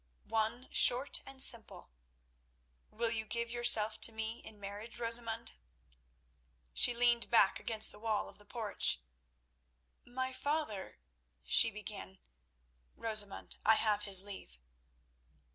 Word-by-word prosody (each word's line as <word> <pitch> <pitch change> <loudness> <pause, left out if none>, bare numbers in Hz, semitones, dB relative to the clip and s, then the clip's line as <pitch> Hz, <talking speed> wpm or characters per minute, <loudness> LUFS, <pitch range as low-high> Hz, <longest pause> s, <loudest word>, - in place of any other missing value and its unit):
"One 225 +3 -3
short 255 +3 +3
and 270 -1 +2
simple. 230 - +5 1.0
Will 230 +1 -3
you 220 -1 -4
give 235 +2 -4
yourself 230 -3 +4
to - - +5
me 225 +1 -6
in 215 -2 -14
marriage, 205 +4 -7
Rosamund?" 230 -1 -4 1.2
She 245 - +5
leaned 240 0 +1
back 225 -4 +2
against 220 -2 +1
the 210 - -15
wall 220 -1 -3
of - - -16
the 205 - -14
porch. 220 -3 -2 1.0
"My 260 +1 -6
father—" 285 -8 -5 0.5
she 65 - +4
began. - - -9 0.8
"Rosamund, 215 -3 -2
I 220 - +4
have 210 -2 -1
his 195 -2 +2
leave." 195 - -9
225 Hz, 120 wpm, -32 LUFS, 210-240 Hz, 1.2 s, simple